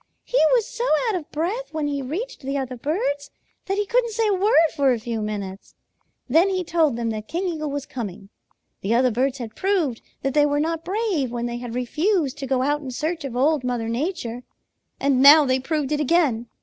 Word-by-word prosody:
"He -, -, 0 dB, 0.2 s
was 465 Hz, -4 st, +2 dB
so 485 Hz, -1 st, -4 dB, 0.2 s
out 440 Hz, -, +1 dB
of 335 Hz, -5 st, -5 dB
breath 380 Hz, +11 st, -2 dB
when 310 Hz, -2 st, -1 dB
he 285 Hz, -1 st, -2 dB
reached 355 Hz, -, -5 dB
the 275 Hz, +1 st, -2 dB
other 260 Hz, -2 st, -3 dB
birds 285 Hz, -, -2 dB, 0.4 s
that 390 Hz, +1 st, -1 dB
he 415 Hz, -, +1 dB
couldn't 470 Hz, +1 st, +1 dB
say 450 Hz, 0 st, +1 dB
a -, -, +3 dB
word 380 Hz, -4 st, +4 dB
for 280 Hz, -3 st, +3 dB
a 240 Hz, -, 0 dB
few 230 Hz, -1 st, -3 dB
minutes. 200 Hz, -2 st, -5 dB, 0.5 s
Then 325 Hz, +9 st, +4 dB
he 370 Hz, -1 st, -1 dB
told 320 Hz, -6 st, +2 dB
them 230 Hz, -1 st, -2 dB
that 215 Hz, 0 st, -5 dB
King 360 Hz, +3 st, -2 dB
Eagle 310 Hz, -3 st, -3 dB
was 285 Hz, -1 st, -4 dB
coming. 205 Hz, -5 st, -7 dB, 0.5 s
The 215 Hz, +4 st, +1 dB
other 250 Hz, +1 st, +3 dB
birds 260 Hz, +4 st, 0 dB
had 230 Hz, -4 st, -7 dB
proved 355 Hz, -, 0 dB, 0.2 s
that 270 Hz, -1 st, 0 dB
they 295 Hz, -1 st, +4 dB
were 290 Hz, 0 st, 0 dB
not 325 Hz, +1 st, -1 dB
brave 380 Hz, -, -1 dB
when 240 Hz, -1 st, -3 dB
they 240 Hz, 0 st, -3 dB
had 240 Hz, -1 st, -6 dB
refused 300 Hz, -, 0 dB
to 270 Hz, -, -4 dB
go 255 Hz, -1 st, +1 dB
out 290 Hz, +2 st, 0 dB
in 270 Hz, -, -6 dB
search 315 Hz, +6 st, -3 dB
of 265 Hz, -4 st, -5 dB
Old 285 Hz, +2 st, +2 dB
Mother 245 Hz, -2 st, -2 dB
Nature, 245 Hz, -2 st, -3 dB, 0.6 s
and 275 Hz, -2 st, +2 dB
now 295 Hz, +2 st, +9 dB
they 260 Hz, 0 st, +2 dB
proved 295 Hz, +1 st, -2 dB
it 300 Hz, -, +1 dB
again. 285 Hz, -6 st, +2 dB
285 Hz, 215 wpm, -23 LUFS, 250-335 Hz, 0.6 s, now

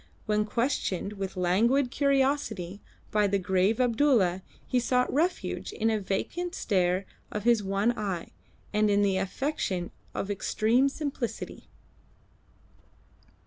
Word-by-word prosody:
When 210 Hz, -1 st, +1 dB
questioned 210 Hz, -5 st, -1 dB
with 195 Hz, -1 st, -5 dB
languid 235 Hz, +9 st, +2 dB
courtesy 265 Hz, -, +1 dB, 0.3 s
by 210 Hz, -1 st, +3 dB
the 200 Hz, 0 st, +1 dB
grave 190 Hz, +4 st, +1 dB
Abdulla 235 Hz, -7 st, +3 dB, 0.2 s
he 250 Hz, -, +1 dB
sought 250 Hz, +1 st, +1 dB
refuge 335 Hz, +6 st, -1 dB
in 225 Hz, 0 st, 0 dB
a 215 Hz, -, +1 dB
vacant 345 Hz, -, -3 dB
stare 185 Hz, -2 st, +1 dB, 0.3 s
of 210 Hz, -, -3 dB
his 235 Hz, -2 st, +4 dB
one 200 Hz, +4 st, +1 dB
eye, 195 Hz, -6 st, -3 dB, 0.4 s
and 210 Hz, 0 st, +3 dB
in 205 Hz, 0 st, +3 dB
the 195 Hz, -2 st, +2 dB
affectation 190 Hz, -, -2 dB, 0.2 s
of 200 Hz, -, -2 dB
extreme 225 Hz, +6 st, +2 dB
simplicity. 275 Hz, -5 st, -5 dB
210 Hz, 120 wpm, -28 LUFS, 195-250 Hz, 0.4 s, his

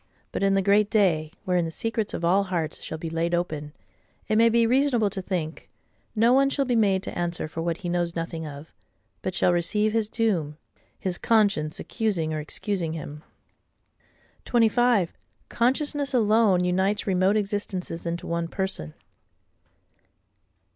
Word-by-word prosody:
But -, -, -3 dB
in 195 Hz, 0 st, +3 dB
the 195 Hz, -, +2 dB
Great 200 Hz, +1 st, +3 dB
Day, 165 Hz, -8 st, +2 dB
wherein 180 Hz, -1 st, +2 dB
the -, -, -3 dB
secrets 225 Hz, +5 st, -3 dB
of 170 Hz, -, -3 dB
all 195 Hz, +3 st, +3 dB
hearts 170 Hz, -4 st, -3 dB
shall 160 Hz, -, -5 dB
be 165 Hz, -, -6 dB
laid 165 Hz, +1 st, 0 dB
open, 155 Hz, -4 st, -3 dB, 0.6 s
it 215 Hz, -, +1 dB
may 230 Hz, +1 st, +6 dB
be 230 Hz, 0 st, +3 dB
reasonable 245 Hz, -4 st, +2 dB
to 190 Hz, -, -4 dB
think, 170 Hz, -4 st, -4 dB, 0.5 s
no 230 Hz, +3 st, +4 dB
one 275 Hz, +1 st, +4 dB
shall 275 Hz, 0 st, 0 dB
be 245 Hz, -2 st, 0 dB
made 195 Hz, -4 st, +2 dB
to -, -, -6 dB
answer 175 Hz, -2 st, -2 dB
for 160 Hz, +1 st, -5 dB
what 170 Hz, 0 st, -1 dB
he -, -, 0 dB
knows 175 Hz, -1 st, -1 dB
nothing 165 Hz, -1 st, -4 dB
of; 145 Hz, +2 st, -10 dB, 0.5 s
but 185 Hz, -, -3 dB
shall 180 Hz, -, +3 dB
receive 210 Hz, +5 st, +1 dB
his 225 Hz, -2 st, 0 dB
doom, 175 Hz, -11 st, 0 dB, 0.4 s
his 180 Hz, -2 st, -3 dB
conscience 200 Hz, -9 st, +2 dB
accusing 185 Hz, -9 st, -1 dB
or 155 Hz, -, -2 dB
excusing 165 Hz, +2 st, -3 dB
him. 150 Hz, -2 st, -7 dB, 1.2 s
25. 235 Hz, -5 st, +3 dB, 0.4 s
Consciousness 280 Hz, +3 st, 0 dB
alone 215 Hz, -5 st, +4 dB
unites 190 Hz, +3 st, +1 dB
remote 190 Hz, +2 st, +2 dB
existences 200 Hz, -4 st, -3 dB
into 170 Hz, +1 st, -3 dB
one 170 Hz, 0 st, -2 dB
Person. 170 Hz, -, -3 dB
190 Hz, 155 wpm, -25 LUFS, 165-220 Hz, 1.2 s, may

